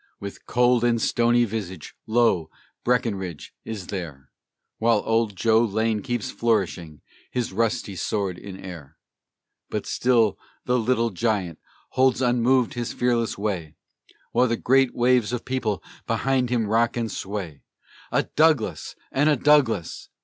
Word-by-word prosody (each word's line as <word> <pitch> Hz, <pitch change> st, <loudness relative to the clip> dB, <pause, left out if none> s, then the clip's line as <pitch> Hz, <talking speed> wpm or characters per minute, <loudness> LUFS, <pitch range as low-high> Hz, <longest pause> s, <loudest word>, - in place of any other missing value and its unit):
With 100 Hz, 0 st, -9 dB
cold 125 Hz, -1 st, +3 dB
and 120 Hz, -1 st, +2 dB
stony 120 Hz, +1 st, +3 dB
visage, 95 Hz, -6 st, -6 dB
lo! 110 Hz, -8 st, +2 dB, 0.3 s
Breckinridge 100 Hz, -, -1 dB
is 105 Hz, -5 st, -6 dB
there, 75 Hz, -8 st, -6 dB, 0.5 s
While 115 Hz, -2 st, +3 dB
old 115 Hz, -2 st, +1 dB
Joe 110 Hz, +4 st, +3 dB
Lane 110 Hz, 0 st, 0 dB
keeps 120 Hz, +2 st, -3 dB
flourishing 95 Hz, -9 st, -1 dB, 0.3 s
his 125 Hz, -5 st, -3 dB
rusty 115 Hz, -1 st, -1 dB
sword 95 Hz, +1 st, -2 dB
in 100 Hz, -2 st, -9 dB
air; 80 Hz, -6 st, -10 dB, 0.7 s
But -, -, -3 dB
still 115 Hz, -4 st, +2 dB, 0.3 s
the 125 Hz, 0 st, +2 dB
"Little 115 Hz, 0 st, +1 dB
Giant" 95 Hz, -5 st, -1 dB, 0.3 s
holds 130 Hz, -1 st, +2 dB
unmoved 125 Hz, 0 st, +2 dB
his 120 Hz, -1 st, -4 dB
fearless 120 Hz, -2 st, 0 dB
way, 90 Hz, -7 st, -3 dB, 0.6 s
While 125 Hz, -, +3 dB
the 115 Hz, -1 st, 0 dB
great 135 Hz, +2 st, +3 dB
waves 120 Hz, -2 st, +3 dB
of 120 Hz, -, -2 dB
the -, -, -14 dB
people 115 Hz, -6 st, -1 dB, 0.2 s
behind 130 Hz, -2 st, +1 dB
him 120 Hz, -3 st, +1 dB
rock 115 Hz, +3 st, +1 dB
and 115 Hz, -3 st, -2 dB
sway 95 Hz, -7 st, -5 dB, 0.5 s
"A -, -, +2 dB
Douglas 145 Hz, -, +1 dB, 0.2 s
and 145 Hz, +3 st, +3 dB
a 150 Hz, -, +4 dB
Douglas! 130 Hz, -, +2 dB
115 Hz, 140 wpm, -24 LUFS, 100-125 Hz, 0.7 s, a